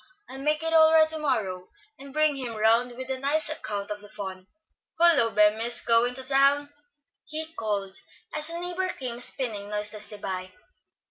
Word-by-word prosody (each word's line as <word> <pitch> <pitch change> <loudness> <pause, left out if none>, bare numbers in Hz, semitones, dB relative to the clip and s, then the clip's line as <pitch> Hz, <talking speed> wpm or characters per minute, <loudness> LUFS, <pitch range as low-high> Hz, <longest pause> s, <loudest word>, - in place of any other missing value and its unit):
I'll 265 - -9
make 300 +3 0
it 325 0 -1
all 320 0 +6
right 320 -1 +6
to 315 0 +2
morrow, 205 -11 -2 0.3
and 275 0 -10
bring 305 0 +2
him 250 -4 -5
round 230 +3 +2
with 260 +2 -6
a 260 - -3
nice 290 +3 +2
account 210 -9 -5
of 205 0 -5
the 205 - -13
fun. 190 -2 -8 0.5
Hullo, 330 -9 +4
Bemis! 220 +3 +4
going 235 +1 +3
to 260 - -3
town?" 280 +2 +2 0.5
he 315 +1 -5
called, 200 -7 -3 0.3
as 305 +1 -1
a 335 0 -4
neighbor 360 +1 -2
came 245 -2 -6
spinning 220 -6 +1
noiselessly 210 0 -5
by. 185 -2 -5
250 Hz, 175 wpm, -26 LUFS, 210-300 Hz, 0.5 s, all